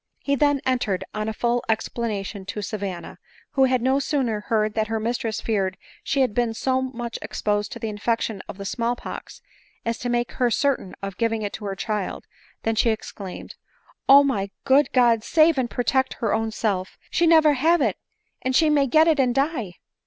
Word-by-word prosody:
He 280 - 0
then 285 0 +2
entered 245 -7 0
on 215 +1 -2
a - - -1
full 240 +2 0
ex 220 0 +1
planation 205 -4 -4
to 210 +1 -4
Savanna; 195 -4 -5 0.3
who 270 -1 +4
had 255 -2 +1
no 265 +2 +3
sooner 265 -7 0
heard 215 0 0
that 220 0 0
her 225 +1 -1
mistress 225 0 -2
feared 195 -4 -1 0.3
she 275 - +1
had 255 -5 +2
been 235 -1 0
so 260 +2 0
much 240 -3 -5
exposed 210 -1 -1
to - - -6
the 225 - -4
infection 215 -1 -1
of - - -7
the 200 - -7
small 235 +4 -1
pox, - - -9 0.4
as 230 0 -1
to 245 - -3
make 240 0 0
her 250 -2 +1
certain 255 -5 0
of 195 -1 -5
giving 225 -2 0
it 205 - -3
to 210 - -7
her 195 -1 -3
child, 210 0 -3 0.4
than 225 - +1
she 230 +1 +2
exclaimed, 200 -4 -6 0.3
" - - -31
Oh, 280 +1 +9
my 200 -8 -1
good 280 +2 +4
God! 235 -3 +4
save 315 0 +4
and 245 -2 0
protect 260 +2 0
her 225 -5 -1
own 225 0 0
self! 200 -4 -2
she 340 - +3
never 315 -2 +6
have 325 +6 +3
it, 225 -9 0 0.4
and 260 0 -1
she 310 +1 +4
may 285 -2 +3
get 315 +5 +5
it 315 -3 +3
and 250 -2 +2
die 270 - 0
235 Hz, 205 wpm, -24 LUFS, 215-265 Hz, 0.4 s, Oh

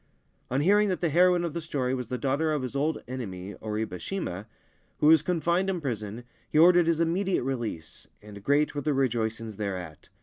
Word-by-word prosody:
On 130 +3 +1
hearing 205 +5 +4
that 185 - -1
the 170 - 0
heroine 175 +2 +4
of 170 -3 -3
the 170 - -3
story 135 -6 -2
was 125 -3 -3
the 125 - -3
'daughter 140 +5 0
of 150 -3 -1
his 130 +2 -5
old 150 +3 -1
enemy 100 -7 -6
Oribe 105 -4 -3
Shima, 105 - -4 0.5
who - - 0
was 160 -1 +7
confined 175 +2 0
in 185 -2 -1
prison, 115 -5 -4 0.3
he - - -1
ordered 175 +1 +6
his 165 -1 +2
immediate 180 +2 +1
release, 120 -11 -5
and 105 -1 -12
great 145 +4 +2
were 145 - -3
the 145 0 0
rejoicings 115 -4 -1
thereat. 90 -7 -5
135 Hz, 195 wpm, -27 LUFS, 110-165 Hz, 0.5 s, was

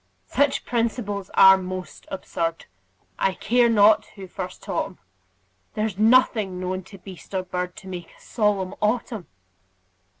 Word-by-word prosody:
Such 285 +1 +2
principles 225 -4 -2
are 190 0 +8
most 185 0 -7
absurd, 165 -3 -3 0.5
I 190 - +1
care 240 +1 +3
not 215 -1 +5
who 195 -2 -9
first 185 0 -7
taught - - -1
'em; - - -15 0.8
There's 215 -2 -2
nothing 215 -5 +3
known 185 +1 -3
to 195 +1 -12
beast 190 0 -11
or 185 - 0
bird 180 0 -4
To 215 -3 -12
make 175 -2 -7
a - - -23
solemn 205 -4 0
autumn. 220 -2 -1
195 Hz, 140 wpm, -24 LUFS, 185-220 Hz, 0.8 s, are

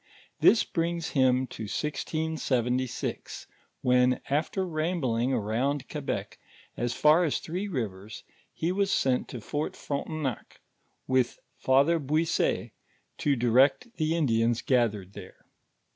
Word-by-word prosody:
This 230 - +6
brings 170 -1 -2
him 130 -1 +3
to 110 - -6
1676, 130 -2 -2 0.4
when 125 0 +3
after 165 +6 0
rambling 155 -7 0
around 125 +4 -1
Quebec, 145 -3 -4 0.4
as 120 0 -1
far 155 +4 +5
as 155 - +1
Three 180 +5 -4
Rivers, 110 - -5 0.3
he 165 +2 -2
was 195 +1 +1
sent 130 -7 +1
to 125 - -7
Fort 145 +7 -3
Frontenac, 140 -3 -4 0.5
with 130 -2 +1 0.2
Father 140 +6 +3
Buisset 155 +3 0 0.5
to 145 -1 +2
direct 130 - +3
the 155 0 +1
Indians 115 -6 +1
gathered 105 -7 +1
there. 95 -3 -12
135 Hz, 115 wpm, -28 LUFS, 120-160 Hz, 0.5 s, This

